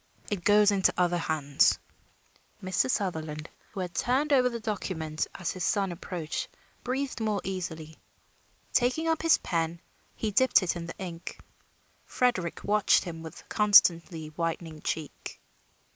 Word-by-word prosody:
"It 195 Hz, -4 st, -2 dB
goes 210 Hz, +1 st, +5 dB
into 195 Hz, -2 st, +3 dB
other 175 Hz, -1 st, +2 dB
hands." 150 Hz, -4 st, +2 dB, 0.9 s
Mr. 185 Hz, +7 st, +1 dB
Sutherland, 160 Hz, -8 st, -2 dB, 0.2 s
who 195 Hz, -, -5 dB
had 180 Hz, -1 st, -4 dB
turned 280 Hz, +4 st, +1 dB
over 250 Hz, -2 st, +5 dB
the 235 Hz, -1 st, -5 dB
document 180 Hz, -8 st, -3 dB
as 175 Hz, -3 st, -3 dB
his 185 Hz, -2 st, -5 dB
son 195 Hz, -2 st, +1 dB
approached, 170 Hz, -2 st, -4 dB, 0.4 s
breathed 265 Hz, +1 st, -2 dB
more 215 Hz, -2 st, 0 dB
easily. 160 Hz, -4 st, -5 dB, 0.8 s
Taking 255 Hz, +7 st, +2 dB
up 325 Hz, -1 st, +1 dB
his 330 Hz, -1 st, +5 dB
pen, 165 Hz, 0 st, -2 dB, 0.4 s
he 220 Hz, -, -2 dB
dipped 260 Hz, -1 st, +4 dB
it 180 Hz, -, -1 dB
in 170 Hz, -1 st, -5 dB
the -, -, -8 dB
ink. 175 Hz, -2 st, -7 dB, 0.7 s
Frederick 235 Hz, -9 st, 0 dB
watched 210 Hz, 0 st, +3 dB
him 165 Hz, -3 st, -7 dB
with 160 Hz, -1 st, -10 dB
constantly 170 Hz, -6 st, +4 dB
whitening 165 Hz, -1 st, -4 dB
cheek. 155 Hz, -3 st, -5 dB
180 Hz, 140 wpm, -28 LUFS, 165-210 Hz, 0.9 s, goes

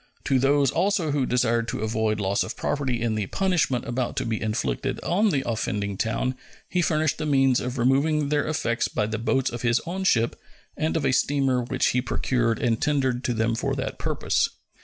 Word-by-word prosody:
To 135 Hz, -2 st, +2 dB
those 140 Hz, 0 st, +3 dB
also 190 Hz, -4 st, +1 dB
who 140 Hz, -3 st, 0 dB
desired 120 Hz, -2 st, +1 dB
to -, -, -3 dB
avoid 110 Hz, -1 st, 0 dB
loss 100 Hz, 0 st, 0 dB
of -, -, -6 dB
property 135 Hz, -4 st, -1 dB
in 115 Hz, -1 st, 0 dB
the 105 Hz, -2 st, -2 dB
punishment 180 Hz, -10 st, 0 dB
about 120 Hz, +1 st, -2 dB
to -, -, 0 dB
be 115 Hz, -2 st, -2 dB
inflicted 105 Hz, -, -2 dB
on 205 Hz, +5 st, +2 dB
the 135 Hz, -7 st, -1 dB
offending 105 Hz, -3 st, -2 dB
town 115 Hz, +5 st, -1 dB, 0.3 s
he 180 Hz, -, 0 dB
furnished 155 Hz, -3 st, +1 dB
the 155 Hz, -, -2 dB
means 135 Hz, -3 st, +3 dB
of 125 Hz, +1 st, -4 dB
removing 140 Hz, +4 st, +2 dB
their 150 Hz, 0 st, +1 dB
effects 145 Hz, -7 st, 0 dB
by 105 Hz, -, -1 dB
the 110 Hz, +1 st, -3 dB
boats 130 Hz, +3 st, +1 dB
of 120 Hz, -1 st, -5 dB
his 120 Hz, 0 st, +2 dB
own 185 Hz, +3 st, -3 dB
ship 115 Hz, -10 st, +1 dB, 0.3 s
and 155 Hz, +1 st, 0 dB
of 160 Hz, -, -1 dB
a -, -, +3 dB
steamer 135 Hz, -1 st, +2 dB
which 130 Hz, +2 st, 0 dB
he 125 Hz, -, +1 dB
procured 120 Hz, -3 st, 0 dB
and 115 Hz, -2 st, 0 dB
tendered 135 Hz, -4 st, +1 dB
to 120 Hz, -, 0 dB
them 110 Hz, +1 st, +1 dB
for 115 Hz, -, -1 dB
that -, -, -4 dB
purpose. -, -, 0 dB
125 Hz, 200 wpm, -25 LUFS, 115-145 Hz, 0.3 s, those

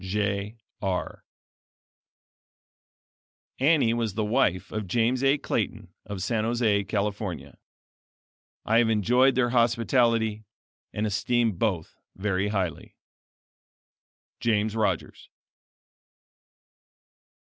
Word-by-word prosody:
Jeigh 100 Hz, +2 st, -2 dB, 0.3 s
Arrh. 95 Hz, -2 st, -3 dB, 2.4 s
Annie 140 Hz, -4 st, +3 dB
was 115 Hz, -4 st, -2 dB
the 110 Hz, -1 st, 0 dB
wife 95 Hz, -4 st, +1 dB
of 105 Hz, -2 st, -4 dB
James 120 Hz, +6 st, +1 dB
A. 135 Hz, +2 st, +4 dB
Clayton -, -, -3 dB
of 100 Hz, -3 st, -5 dB
San 110 Hz, +1 st, 0 dB
Jose, 110 Hz, -3 st, +1 dB
California. 100 Hz, -3 st, -3 dB, 1.1 s
I 115 Hz, +2 st, +4 dB
have 120 Hz, -1 st, +3 dB
enjoyed 125 Hz, +5 st, +3 dB
their 120 Hz, -1 st, +2 dB
hospitality 115 Hz, -2 st, +2 dB, 0.5 s
and 105 Hz, -, -2 dB
esteem 115 Hz, +2 st, +1 dB
both 90 Hz, -4 st, -2 dB, 0.2 s
very 100 Hz, 0 st, -1 dB
highly. 95 Hz, -5 st, -3 dB, 1.4 s
James 110 Hz, -1 st, 0 dB
Rogers. 95 Hz, -7 st, -2 dB
110 Hz, 90 wpm, -26 LUFS, 100-120 Hz, 2.4 s, A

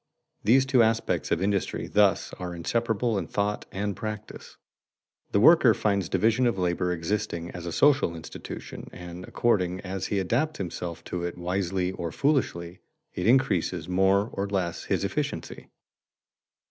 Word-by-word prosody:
These 130 Hz, +5 st, +5 dB
two 130 Hz, -2 st, +4 dB
aspects 115 Hz, 0 st, +1 dB
of -, -, +1 dB
industry 100 Hz, -1 st, -1 dB
thus 100 Hz, -3 st, +2 dB
are 90 Hz, -1 st, -5 dB
inseparable 115 Hz, +4 st, 0 dB
in -, -, -5 dB
thought 105 Hz, 0 st, -2 dB
and 100 Hz, 0 st, -2 dB
practice. 105 Hz, -1 st, -7 dB, 0.7 s
The 100 Hz, -, +3 dB
worker 125 Hz, -2 st, +7 dB
finds 100 Hz, -4 st, 0 dB
division 115 Hz, +3 st, +2 dB
of 115 Hz, -, 0 dB
labor 90 Hz, 0 st, 0 dB
existing 85 Hz, -1 st, -2 dB
as 85 Hz, -1 st, -7 dB
a -, -, -3 dB
social 130 Hz, -, +3 dB
institution 80 Hz, -, -8 dB
and, 90 Hz, 0 st, -9 dB
according 95 Hz, -6 st, +1 dB
as 95 Hz, 0 st, -4 dB
he 100 Hz, -, -1 dB
adapts 120 Hz, -, 0 dB
himself 85 Hz, -2 st, -5 dB
to 90 Hz, 0 st, -4 dB
it 85 Hz, 0 st, -4 dB
wisely 90 Hz, +1 st, -1 dB
or 85 Hz, -3 st, -5 dB
foolishly, 90 Hz, -, 0 dB, 0.3 s
it 90 Hz, -, -2 dB
increases 95 Hz, -, +2 dB
more 95 Hz, +3 st, +2 dB
or 100 Hz, +1 st, -2 dB
less 95 Hz, -4 st, -2 dB
his -, -, 0 dB
efficiency. -, -, -4 dB
95 Hz, 145 wpm, -27 LUFS, 90-110 Hz, 0.7 s, worker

